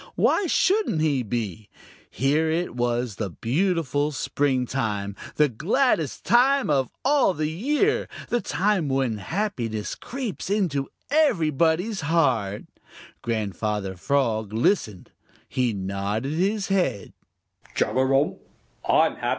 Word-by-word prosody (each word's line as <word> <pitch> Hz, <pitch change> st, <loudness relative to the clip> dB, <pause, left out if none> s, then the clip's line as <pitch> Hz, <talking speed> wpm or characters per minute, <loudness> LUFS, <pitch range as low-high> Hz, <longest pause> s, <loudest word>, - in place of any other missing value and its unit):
Why 390 Hz, -, +2 dB
shouldn't 385 Hz, -, +2 dB
he 145 Hz, -4 st, +2 dB
be? 110 Hz, -3 st, -4 dB, 0.4 s
Here 145 Hz, -, +1 dB
it 165 Hz, -4 st, -1 dB
was 120 Hz, -3 st, -1 dB
the 105 Hz, -3 st, -2 dB
beautiful 150 Hz, -, 0 dB
springtime, 125 Hz, -8 st, -1 dB, 0.2 s
the 150 Hz, -, +4 dB
gladdest 165 Hz, -, 0 dB
time 260 Hz, -, +4 dB
of 135 Hz, -3 st, +2 dB, 0.2 s
all 275 Hz, -8 st, +3 dB
the 155 Hz, +1 st, -1 dB
year, 295 Hz, -, +1 dB, 0.2 s
the 240 Hz, -, +1 dB
time 185 Hz, -1 st, 0 dB
when 130 Hz, -5 st, 0 dB
happiness 120 Hz, -, -3 dB
creeps 245 Hz, -8 st, -5 dB
into 170 Hz, -10 st, 0 dB, 0.2 s
everybody's 180 Hz, -, +2 dB
heart. 130 Hz, -11 st, +1 dB, 0.6 s
Grandfather 105 Hz, -3 st, -2 dB
Frog 115 Hz, -2 st, 0 dB
listened. 110 Hz, -, 0 dB, 0.4 s
He 125 Hz, -2 st, 0 dB
nodded 100 Hz, +5 st, -3 dB
his 195 Hz, +5 st, 0 dB
head. 185 Hz, -, 0 dB
145 Hz, 100 wpm, -24 LUFS, -, 0.6 s, the